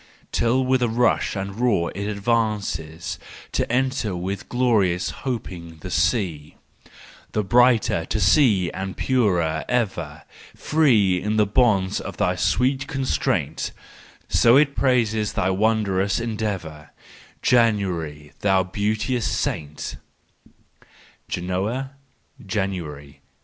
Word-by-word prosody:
Till 130 +3 +1
with 130 0 +2
a 120 - +2
rush 115 0 +1
and 100 0 -3
a - - -10
roar 105 -6 +1
it 100 +2 -4
advances 100 -7 -2 0.3
To - - -1
enter 125 -5 0
with 95 +1 -5
glorious 105 -8 +1 0.2
hoping 85 -9 -5
the 90 - -7
sea: 85 -4 0 0.8
Brighter 115 -4 +3
to 110 - -2
see 100 - +4
and 95 -1 -5
purer 90 -11 +1
ever, 85 -11 -2 0.3
Free 110 - +3
in 105 +1 -1
the 105 - +4
bonds 100 -3 +2
of - - -7
thy 90 -3 +1
sweet 125 +10 +1
constraint,— 135 -3 -1 0.6
So 120 +2 +5
it 140 -1 +3
praises 110 -5 +1
thy 90 - +1
wondrous 100 -1 +1
en¬ 115 -1 -3
deavour, 85 -8 -4 0.5
January, 90 -11 +1
thou 95 -2 +3
beauteous 105 +5 -1
saint 75 0 -3 0.8
1 - - -25 0.4
Genoa, 100 +9 -2 0.5
January 95 -5 -2
1882. 70 -1 -12
100 Hz, 115 wpm, -23 LUFS, 90-120 Hz, 0.8 s, So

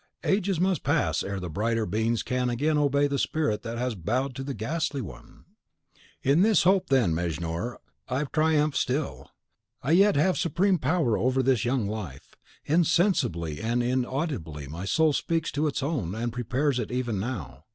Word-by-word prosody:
Ages 195 -3 +1
must 185 0 +1
pass 85 - +1
ere 100 0 -3
the 90 - -5
brighter 110 +6 -1
beings 110 +4 0
can 125 -1 -1
again 145 +6 +1
obey 145 -1 +2
the 140 -1 -1
spirit 150 -9 0
that 115 0 -5
has 125 0 -1
bowed 120 +9 -1
to 135 +1 -5
the 140 0 -4
ghastly 150 - -2
one! 65 - -10 0.8
And.... 135 - +2
In 165 - +4
this 215 +1 +4
hope, 190 +1 +3
then, 125 -11 +3
Mejnour, 85 +6 -3 0.3
I 130 +3 0
triumph 155 -1 +1
still; 135 +3 -2 0.5
I 135 - 0
yet 195 +4 +5
have 165 +6 +2
supreme 180 +2 +2
power 145 -5 +1
over 130 +2 +1
this 125 -4 +2
young 120 -2 +1
life. 100 -11 -7 0.3
Insensibly 155 - +1
and 120 +2 0
inaudibly 125 - -2
my 85 +7 -6
soul 160 +7 +3
speaks 165 +2 -1
to 150 +2 0
its 140 - -2
own, 130 - -2
and 115 +1 -3
prepares 125 +3 0
it 115 - -4
even 120 -5 -1
now. 105 - -5
130 Hz, 170 wpm, -27 LUFS, 110-155 Hz, 0.8 s, yet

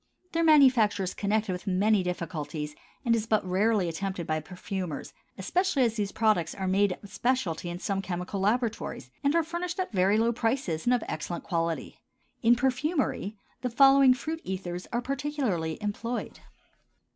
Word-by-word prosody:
Their 335 0 +1
manufacture 260 -10 +5
is 185 - -3
connected 210 0 0
with 180 +1 -5
many 200 +2 +3
difficulties 160 -4 -4 0.3
and 230 -1 +4
is 225 -1 -2
but 215 -3 +2
rarely 195 +1 +2
attempted 185 +1 -3
by 155 0 0
perfumers, 180 0 -5 0.2
especially 310 - +1
as 230 -3 +2
these 205 -3 -2
products 215 -7 +1
are 190 -1 -3
made 195 0 +2
a - - -9
specialty 195 -5 -1
in 175 - -4
some 195 +1 -2
chemical 180 +1 -4
laboratories 220 - -1
and 285 +3 +2
are 335 - +4
furnished 345 +2 -4
at 370 - -2
very 195 +2 +3
low 230 +1 +2
prices 225 - -1
and 250 - +4
of 240 - -2
excellent 170 +2 -4
quality. 165 -1 -2 0.4
In 235 +1 +5
perfumery 265 - -1 0.2
the 250 - -1
following 270 +1 +6
fruit 320 +5 -4
ethers 180 -1 -5
are 240 0 -1
particularly 270 - -2
employed. 230 +4 -3
210 Hz, 160 wpm, -28 LUFS, 180-255 Hz, 0.4 s, following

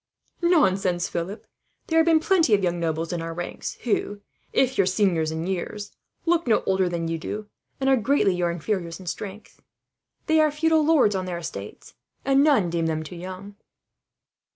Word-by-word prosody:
"Nonsense, 195 - +2
Philip. 180 +6 -5 0.4
There 325 0 +2
have 325 - +3
been 325 -1 +5
plenty 325 - +3
of 200 - -2
young 175 -1 0
nobles 165 0 -2
in 170 - -2
our 165 0 -5
ranks 175 0 -5
who, 205 -3 -1 0.3
if 265 0 +2
your 195 -5 +3
seniors 185 -5 +1
in 160 +1 -3
years, 190 +3 -4 0.3
look 340 -3 +2
no 225 - +3
older 190 -1 +2
than 170 -1 -2
you 165 0 -2
do, 210 +5 -6 0.3
and 270 - -1
are 270 -1 +5
greatly 235 -4 +2
your 175 -1 0
inferiors 170 0 -3
in 185 - -11
strength. 200 +4 -7 0.6
They 315 0 +3
are 310 0 +5
feudal 315 +1 +2
lords 295 -9 +4
on 190 -1 -2
their 175 -1 -3
estates, 105 -12 -8 0.3
and 275 +1 +4
none 255 - +3
deem 165 -1 0
them 155 -1 -1
too 155 +3 -9
young." 185 +3 -8
190 Hz, 180 wpm, -24 LUFS, 170-270 Hz, 0.6 s, been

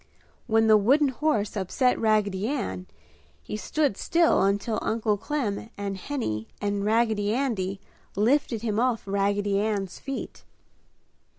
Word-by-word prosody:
When 225 -1 +3
the 215 -1 +7
wooden 275 +8 +4
horse 245 -7 0
upset 210 +6 +1
Raggedy 210 -2 +1
Ann, 95 - -3 0.6
he - - -5
stood 255 +3 0
still 335 0 +3
until 205 +3 +1
Uncle 220 -1 0
Clem 220 -3 -3
and 200 -1 -3
Henny 185 - -3
and 205 -1 -1
Raggedy 220 -1 +1
Andy 200 -8 -1 0.4
lifted 230 +1 +1
him 215 -2 0
off 245 -2 +1
Raggedy 200 0 0
Ann's 200 -3 -2
feet. 275 -1 -6
215 Hz, 125 wpm, -26 LUFS, 200-245 Hz, 0.6 s, the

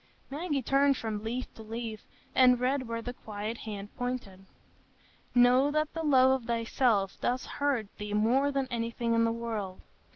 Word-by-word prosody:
Maggie 290 -2 -2
turned 275 +2 +3
from 215 -2 -4
leaf 240 +3 -4
to - - -12
leaf, 220 0 -6 0.3
and 250 -1 +6
read 255 0 0
where 230 0 -4
the 245 - -4
quiet 215 0 -6
hand 205 -2 -7
pointed: 220 -7 -4 0.9
"Know 250 +3 +5
that 305 +1 0
the 325 - -3
love 260 -4 +5
of 230 - -14
thyself 230 -3 +1
doth 255 +2 0
hurt 285 -6 -1
thee 210 0 -3
more 255 +7 +3
than 275 -1 -1
anything 230 0 -1
in 230 0 +3
the 230 - +1
world.... 225 -5 -4
235 Hz, 165 wpm, -30 LUFS, 220-260 Hz, 0.9 s, and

